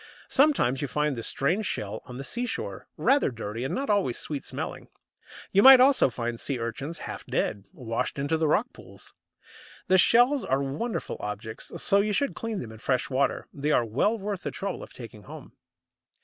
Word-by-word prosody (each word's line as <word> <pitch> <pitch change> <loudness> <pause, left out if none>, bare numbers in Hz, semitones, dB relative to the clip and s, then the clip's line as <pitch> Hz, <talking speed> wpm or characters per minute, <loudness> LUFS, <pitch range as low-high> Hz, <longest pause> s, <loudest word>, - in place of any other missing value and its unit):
Sometimes 260 - +3
you 145 - -1
find 150 +1 0
this 115 - -2
strange 185 +10 0
shell 105 +1 -4
on 125 - -9
the 135 - -5
seashore, 240 - -4
rather 280 +1 +3
dirty, 115 -1 -5
and 135 +6 -2
not 275 +1 -2
always 200 - +1
sweet 145 -3 -4
smelling. - - -6 0.6
You 200 - +5
might 265 +2 +10
also 265 - +5
find 120 -1 -4
Sea 140 - -2
urchins 135 +7 -5
half - - -6
dead, 100 -1 -1
washed 115 -2 -3
into 140 +3 0
the 160 -1 +1
rock 205 +10 +3
pools. - - -13 0.7
The 190 0 +4
shells 245 +7 +5
are 135 +1 0
wonderful 150 - -3
objects, 105 +2 -6
so 200 - +4
you 210 +1 +1
should 280 +7 0
clean 225 -2 -4
them 115 -3 -8
in 110 - -12
fresh 125 0 -1
water; 135 +2 0
they 145 +1 -2
are 120 - +3
well 140 - +1
worth 200 -2 -4
the - - -3
trouble 195 -1 -5
of - - -10
taking 115 -3 -11
home. - - -11
140 Hz, 190 wpm, -27 LUFS, -, 0.7 s, might